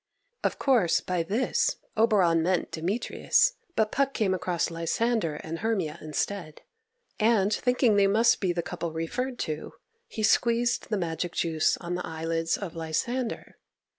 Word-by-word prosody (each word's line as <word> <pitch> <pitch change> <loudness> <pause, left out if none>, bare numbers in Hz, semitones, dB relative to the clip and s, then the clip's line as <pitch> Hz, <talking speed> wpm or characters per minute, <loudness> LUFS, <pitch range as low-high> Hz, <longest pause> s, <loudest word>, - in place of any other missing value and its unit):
Of - - 0
course, 240 -11 +3
by 180 -2 -1
this, 210 +10 0 0.2
Oberon 200 -7 +4
meant 180 +2 0
Demetrius; 235 - +1 0.2
but 215 -1 +1
Puck 275 0 0
came 200 -5 +1
across 175 -2 -1
Lysander 165 +1 0
and 160 +2 -6
Hermia 195 -9 -1
instead, 155 +1 -4 0.6
and, 215 -2 +3
thinking 250 -3 +2
they 200 -1 +5
must 225 +4 +4
be 185 -3 +1
the 170 -1 -2
couple 170 0 -4
referred 245 +11 -3
to, 155 -1 -4 0.3
he 220 - -5
squeezed 235 +2 +2
the 215 - 0
magic 170 -1 -3
juice 160 -2 +1
on 175 0 -5
the 180 - -2
eyelids 165 +1 -1
of 185 -5 -6
Lysander. 230 +10 -3
185 Hz, 145 wpm, -27 LUFS, 165-230 Hz, 0.6 s, they